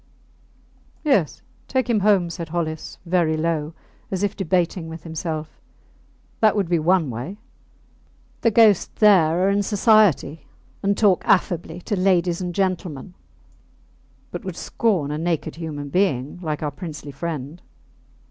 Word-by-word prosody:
Yes, 210 - +1 0.2
take 260 -1 0
him 230 -3 +2
home, 195 -4 +3
said 165 -1 -6
Hollis, 160 -2 -4
very 170 -3 +1
low, 160 -1 -1 0.3
as 190 0 -2
if 205 +1 0
debating 180 -2 0
with 160 0 -9
himself. 160 -1 -5 0.8
That 215 -1 +4
would 200 -4 0
be 170 -1 +1
one 165 -3 +2
way. 125 - -6 1.0
The 230 - +4
ghosts 220 -3 +5
there 180 -4 +4
are - - +3
in 200 +1 +2
society, 205 - +3 0.3
and 200 0 +1
talk 200 -5 +4
affably 175 -2 +1
to 205 - -2
ladies 180 -2 +2
and 175 -1 -4
gentlemen, 185 -4 -2 1.2
but - - -6
would 185 -3 -5
scorn 185 -11 0
a 150 - -3
naked 165 -1 -2
human 150 -4 -5
being 150 -4 0
like 155 -3 -3
our 150 - -1
princely 150 -2 -8
friend. 155 +1 -5
175 Hz, 140 wpm, -22 LUFS, 155-195 Hz, 1.2 s, ghosts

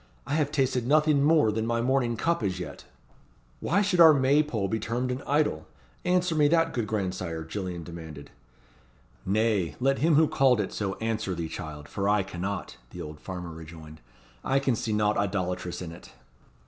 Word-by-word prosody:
I - - -3
have 150 -2 +1
tasted 130 -4 0
nothing 150 0 +4
more 150 -6 +4
than 110 +1 -2
my 115 0 0
morning 120 -1 +1
cup 170 +7 0
as 95 -2 -2
yet." 75 -6 -8 0.7
"Why 200 +5 +1
should 190 -3 0
our 160 -2 +9
May 140 +2 +4
pole 115 -10 -2
be 110 +3 -1
termed 120 +4 -2
an 125 +2 -3
idol? 145 - +1 0.4
Answer 180 -1 +2
me 150 -2 +4
that, 165 +2 +2
good 115 -4 -2
grandsire?" 90 -5 -3
Gillian 90 0 -5
demanded. 80 -4 -9 1.0
"Nay, 105 -3 +1
let 135 +2 +1
him 160 0 +3
who 155 +1 +5
called 130 -5 +3
it 100 - -2
so 100 -2 -2
answer 110 -4 -2
thee, 85 -1 -3
child, 75 -3 -7
for 100 0 -1
I 105 -1 +3
cannot," 95 +2 -5
the - - -10
old 75 0 -7
farmer 90 -3 -6
rejoined. 80 -1 -11 0.4
"I 135 - +1
can 135 -3 +1
see 110 - -3
naught 105 0 +1
idolatrous 90 -3 -2
in 85 - -7
it." 85 - -13
110 Hz, 185 wpm, -27 LUFS, 90-140 Hz, 1.0 s, our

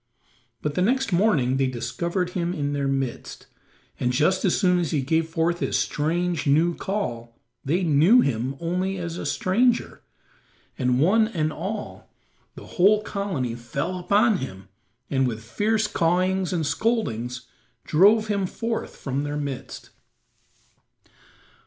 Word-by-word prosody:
But 150 - -1
the 180 - -1
next 255 +2 +1
morning 160 - +2
they 135 -1 +2
discovered 170 - -2
him 175 -1 -2
in 145 -3 -2
their 140 -1 -1
midst, 135 -2 -3 0.5
and 125 - +1
just 155 +9 +2
as 185 - +2
soon 180 -3 +3
as 170 - -1
he 145 -5 0
gave 160 +4 0
forth 165 +1 0
his - - 0
strange, 170 +1 -1
new 160 +5 +3
call 120 - -4 0.3
they 170 +7 0
knew 170 - +5
him 130 - -1
only 180 +3 -2
as 170 -1 -5
a - - -4
stranger, 235 +6 +1 0.7
and 125 -2 +1
one 215 +9 +4
and 155 -8 -2
all 210 +1 -6 0.4
the - - -10
whole 210 +3 +3
colony 185 - -3
fell 140 +10 -4
upon 205 +4 +3
him 95 - -8 0.4
and, 135 -2 +2
with 110 -2 -5
fierce 215 - 0
cawings 185 0 +1
and 170 -4 -1
scoldings, 125 - -1 0.4
drove 205 +7 +4
him 200 -3 -1
forth 230 +4 -4
from 135 0 -3
their 145 0 -3
midst. 140 -3 -6
170 Hz, 140 wpm, -24 LUFS, 135-195 Hz, 0.7 s, knew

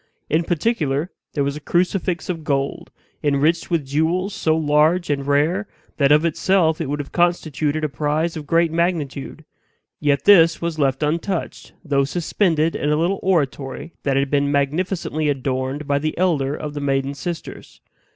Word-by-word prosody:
In 160 +2 +3
particular, 165 - -1 0.2
there 145 - 0
was 140 0 -2
a - - -6
crucifix 175 +2 0
of 165 -3 -4
gold, 140 -2 -2 0.3
enriched 150 +3 +1
with 165 -5 0
jewels 165 +8 0
so 160 0 +1
large 155 +3 +2
and 140 -1 -2
rare, 160 +8 +1 0.3
that 140 -1 +3
of 150 +2 +5
itself 170 0 +2
it 150 - -3
would 145 - -1
have 145 -1 -6
constituted 155 -3 0
a - - +2
prize 150 +3 -1
of 150 -2 -7
great 165 0 +3
magnitude. 160 -3 -2 0.5
Yet 140 -2 +1
this 165 -5 +6
was 170 -2 -3
left 135 0 +1
untouched, 165 +4 -3
though 140 -3 +2
suspended 165 0 0
in 145 - -1
a 150 - +3
little 175 +5 0
oratory 145 -3 -1
that 135 -1 0
had 140 0 0
been 140 0 +2
magnificently 155 +2 -1
adorned 135 +1 -2
by 140 0 +1
the 155 +1 -3
elder 150 -6 +1
of 150 -1 -6
the 145 - -5
maiden 135 0 0
sisters. 170 +4 -7
155 Hz, 165 wpm, -21 LUFS, 140-170 Hz, 0.5 s, this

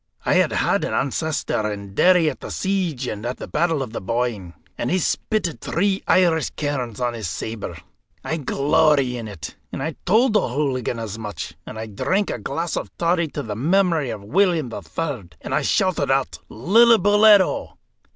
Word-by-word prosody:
I - - +2
had - - +3
had - - +1
an - - -2
ancestor 140 -6 -1
in 100 -1 -7
Derry 180 - +4
at - - -2
the - - -8
siege 180 -9 -1
and 105 -3 -5
at 125 +1 -3
the - - -7
Battle 160 -2 0
of 115 - -9
the - - -4
Boyne, 105 -4 -2 0.2
and 120 - -2
he 185 - +2
spitted 185 0 -1
three 195 +3 0
Irish 165 -5 +3
kerns 130 -7 -3
on 120 -1 0
his 110 -6 -4
sabre. 105 -6 -5 0.5
I 160 - -2
glory 140 -2 +2
in 115 -2 -6
it, 100 -6 -8 0.2
and 135 - -4
I 160 +2 -2
told 220 +4 +4
O'Hooligan 130 - 0
as 110 -1 -5
much, 105 -5 -6
and - - -7
I 110 - -4
drank 185 - -1
a - - -4
glass 170 0 -3
of - - -4
toddy 170 0 +1
to 145 -1 -5
the 105 -2 -5
memory 165 - +2
of 105 -3 -6
William 160 - +1
III., 140 - -5
and - - -5
I - - +2
shouted 185 -7 +1
out 135 - 0
Lillibulero! 205 - +4
145 Hz, 180 wpm, -22 LUFS, 115-180 Hz, 0.5 s, Derry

